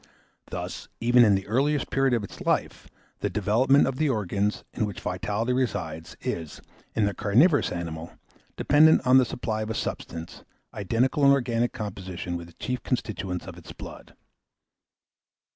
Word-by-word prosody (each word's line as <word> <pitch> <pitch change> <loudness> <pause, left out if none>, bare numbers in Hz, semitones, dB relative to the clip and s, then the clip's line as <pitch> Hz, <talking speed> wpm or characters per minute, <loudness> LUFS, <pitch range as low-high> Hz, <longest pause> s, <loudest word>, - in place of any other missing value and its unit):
Thus, - - -6
even 120 +1 +5
in 105 -3 +5
the 95 - -2
earliest 140 +7 0
period 135 -2 +2
of 115 - -1
its 100 - -9
life, - - -1 0.3
the - - -1
development 115 +7 +3
of 135 -1 -2
the 155 0 +1
organs, 105 -3 -1
in 110 - -1
which 100 - -7
vitality 105 +6 -2
resides, 80 - -3
is, 80 -3 -4 0.4
in 105 - +3
the 100 - 0
carnivorous 130 - +3
animal, 85 -1 -5 0.4
dependent 155 -1 +5
on 130 +1 +7
the 130 - +3
supply 110 -3 -3
of 110 - -4
a 110 - -2
substance, 80 -5 -5 0.3
identical 120 +8 0
in 140 - +7
organic 120 -3 +2
composition 95 -6 -5
with 85 -1 -6
the 85 - -16
chief 125 +5 -4
constituents 95 -8 -3
of 90 -2 -9
its 85 - -11
blood. - - -11
110 Hz, 160 wpm, -26 LUFS, 95-130 Hz, 0.4 s, on